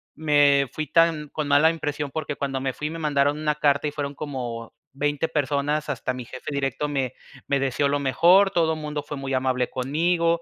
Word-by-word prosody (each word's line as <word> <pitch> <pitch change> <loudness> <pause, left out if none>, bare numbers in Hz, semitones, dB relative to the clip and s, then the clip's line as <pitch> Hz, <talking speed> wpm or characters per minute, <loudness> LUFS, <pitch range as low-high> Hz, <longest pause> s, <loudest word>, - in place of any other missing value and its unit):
me 145 -3 +3
fui 155 -2 -3
tan 160 -1 +2
con 155 0 -3
mala 145 +3 +5
impresión 150 -3 -4
porque 150 -1 -4
cuando 135 -1 -3
me 130 -1 -2
fui 150 +3 -4
me 165 +1 -6
mandaron 145 -1 +1
una 150 -1 0
carta 145 0 +2
y - - -2
fueron 145 -1 -4
como 120 -6 -5 0.2
20 145 +2 -1
personas, 150 0 0
hasta 130 -2 -2
mi 125 -1 -7
jefe 125 +4 -8
directo 140 +1 -1
me 135 -3 -1 0.3
me 140 -1 +1
deseó 135 +1 +1
lo 145 0 +1
mejor, 175 +8 +4
todo 165 -4 +2
mundo 150 -1 -4
fue 145 0 -6
muy 135 0 -4
amable 130 -1 0
conmigo, 165 +5 +1
145 Hz, 195 wpm, -24 LUFS, 135-155 Hz, 0.3 s, mala